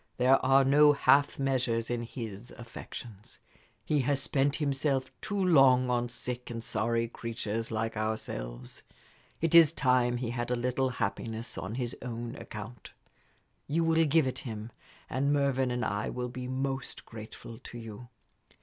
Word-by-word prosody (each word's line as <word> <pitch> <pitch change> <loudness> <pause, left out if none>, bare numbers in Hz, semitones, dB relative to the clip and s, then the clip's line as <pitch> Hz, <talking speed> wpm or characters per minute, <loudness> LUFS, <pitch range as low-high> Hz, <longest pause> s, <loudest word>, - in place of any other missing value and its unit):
There 130 +2 +4
are 135 +1 +5
no 145 +2 +6
half 140 0 +4
measures 125 -4 0
in 120 -1 -1
his 115 -2 -7
affections. 115 -2 -9 0.5
He 150 - +2
has 140 +1 +1
spent 140 +1 +1
himself 140 -2 0
too 205 - -3
long 135 -9 +5
on 120 0 0
sick 125 +1 -5
and 115 -1 -5
sorry 115 +1 0
creatures 115 -1 -4
like 115 0 -2
ourselves. 65 - -4 0.6
It 165 0 +1
is 165 -3 +8
time 125 -5 +2
he 120 -1 -3
had 120 0 -3
a 125 - +1
little 125 +2 0
happiness 115 +1 -3
on 95 +5 -5
his 125 -2 -3
own 120 0 -5
account. 110 -2 -9 0.7
You 165 +3 +1
will 165 0 +4
give 155 0 +4
it 130 - -3
him, 110 -2 -6 0.4
and 140 +2 0
Mervyn 140 -3 +2
and 125 0 -1
I 105 +2 -1
will 125 0 -3
be 125 +1 -6
most 135 +1 -3
grateful 115 +1 -10
to 120 - -10
you. 115 +1 -9
125 Hz, 155 wpm, -30 LUFS, 115-135 Hz, 0.7 s, is